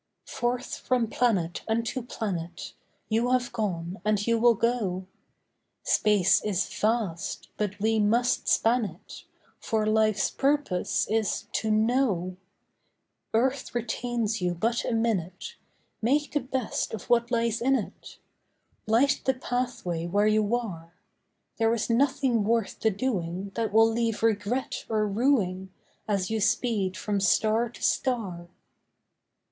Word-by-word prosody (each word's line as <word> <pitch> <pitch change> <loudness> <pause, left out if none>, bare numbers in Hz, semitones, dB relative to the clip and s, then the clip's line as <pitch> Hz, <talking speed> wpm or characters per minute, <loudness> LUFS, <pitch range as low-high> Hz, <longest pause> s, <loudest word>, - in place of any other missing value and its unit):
Forth 245 +1 -2
from 245 -3 0
planet 195 -9 +1
unto 230 +3 -1
planet, 190 -8 -5 0.3
You 230 +2 +1
have 250 -1 +1
gone, 185 -5 -3
and 210 -1 +1
you 230 -1 +2
will 235 0 +5
go. 210 -5 -1 0.8
Space 205 -4 +3
is 205 -3 0
vast, 210 -6 -2
but 210 -1 -3
we 220 +1 +2
must 235 +4 +2
span 235 +2 +3
it; 180 -2 -9 0.3
For 220 -1 -1
life's 215 -1 +2
purpose 280 -10 0
is 220 -2 -1
to 220 - -1
know. 215 -5 +1 1.0
Earth 255 +2 0
retains 235 -2 -2
you 180 -1 0
but 230 +7 0
a - - -1
minute, 225 - -2 0.4
Make 285 +6 +1
the 295 - +1
best 255 -4 -2
of 210 - -10
what 235 0 +3
lies 230 -2 0
in 270 +3 +3
it; - - -6 0.7
Light 255 +6 +3
the 265 - +2
pathway 245 -10 -3
where 205 +4 +2
you 215 +1 +2
are. 170 -8 -6 0.6
There 225 0 +3
is 230 +1 -2
nothing 260 -2 +2
worth 225 0 0
the 220 - +3
doing 195 -4 -2
That 225 -2 -1
will 225 +1 +5
leave 225 -1 -1
regret 225 +3 0
or 215 -1 +1
rueing, 200 -5 +1 0.4
As 200 -2 -1
you 220 -1 0
speed 210 -3 +1
from 205 -1 -1
star 220 +4 +2
to 240 - -12
star. 200 -10 -1
220 Hz, 130 wpm, -27 LUFS, 200-240 Hz, 1.0 s, will